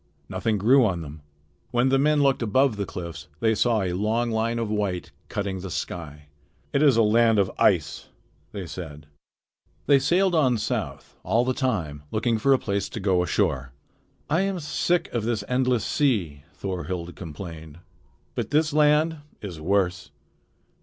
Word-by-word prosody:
Nothing 110 -2 -1
grew 125 +7 +5
on 95 -6 0
them. 75 -1 -9 0.5
When 120 +2 +2
the 135 0 +3
men 150 +1 +3
looked 135 -2 +2
above 120 +2 +2
the 100 -2 -3
cliffs 80 -4 -7
they 110 -1 +2
saw 110 -1 +2
a 90 -1 -2
long 110 +5 0
line 115 +1 0
of 115 -1 -1
white 100 -4 -2 0.2
cutting 100 -2 -3
the 95 +1 -6
sky. 75 -2 -5 0.5
"It 140 - +2
is 140 -6 +5
a 115 - +5
land 115 +1 +4
of 100 -2 +2
ice," - - +2 0.4
they 100 -3 -6
said. 75 -2 -8 0.8
They 140 -1 +5
sailed 175 +7 +2
on 130 -7 +3
south, 105 - -4
all 120 +2 +1
the 130 - +1
time 90 - -2
looking 110 +1 0
for 135 +5 +2
a 135 - +6
place 100 -4 -2
to - - -6
go 95 -3 +2
ashore. 65 -6 0 0.5
"I 160 +5 +2
am 195 -2 -1
sick 175 +3 0
of 120 - -1
this 110 -2 -1
endless 125 -2 +1
sea," 95 - 0
Thorhild 90 -2 -4
complained, 80 -2 -9 0.6
"but - - -3
this 150 +1 +2
land 150 +2 +3 0.2
is 90 -7 -7
worse." 90 0 0
110 Hz, 165 wpm, -25 LUFS, 90-130 Hz, 0.8 s, a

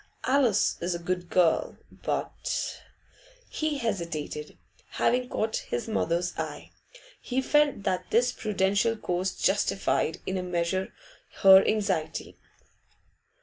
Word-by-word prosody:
Alice 255 -6 +2
is 175 +1 -1
a - - -2
good 175 0 -3
girl, 175 -3 +2
but - - -3 0.3
' - - -27
He 310 -2 0
hesitated, 170 - -4 0.4
having 250 +1 +1
caught 220 0 -1
his 120 - -4
mother's 175 -4 0
eye. - - -5 0.5
He 255 +1 -1
felt 290 -4 +2
that 185 -2 -1
this 245 +2 +3
prudential 205 +2 +1
course 185 -3 -2
justified 195 -4 +1
in 190 0 -2
a - - -2
measure 180 +1 -1 0.5
her 190 0 +9
anxiety. 190 -7 -1
190 Hz, 115 wpm, -27 LUFS, 175-230 Hz, 0.5 s, her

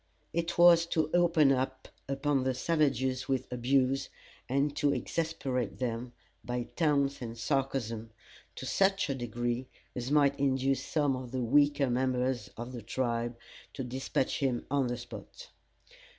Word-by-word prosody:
It 170 +1 -1
was 170 -1 +7
to 155 -2 0
open 170 -5 +5 0.6
upon 140 0 +1
the 130 -1 0
savages 130 -3 +1
with 130 -2 0
abuse, 135 +2 +1 0.4
and 140 +2 +1
to 145 - +3
exasperate 135 -11 -2
them, 120 0 -3 0.3
by 125 0 -2
taunts 140 -4 +1
and 115 -1 -6
sarcasm, 115 -4 -1 0.5
to - - -6
such 195 -5 +2
a - - +1
degree 120 0 -2 0.3
as 125 +1 -3
might 140 -1 +3
induce 135 0 +1
some 145 -4 +1
of 130 -1 -6
the 130 0 -2
weaker 145 +1 +3
members 125 -2 0
of 120 +2 -6
the 120 -2 -6
tribe 115 +1 -2 0.4
to 135 - -3
dispatch 130 +1 -1
him 130 -4 0
on 140 -3 +2
the 120 0 -2
spot. - - -10
130 Hz, 140 wpm, -31 LUFS, 125-145 Hz, 0.6 s, was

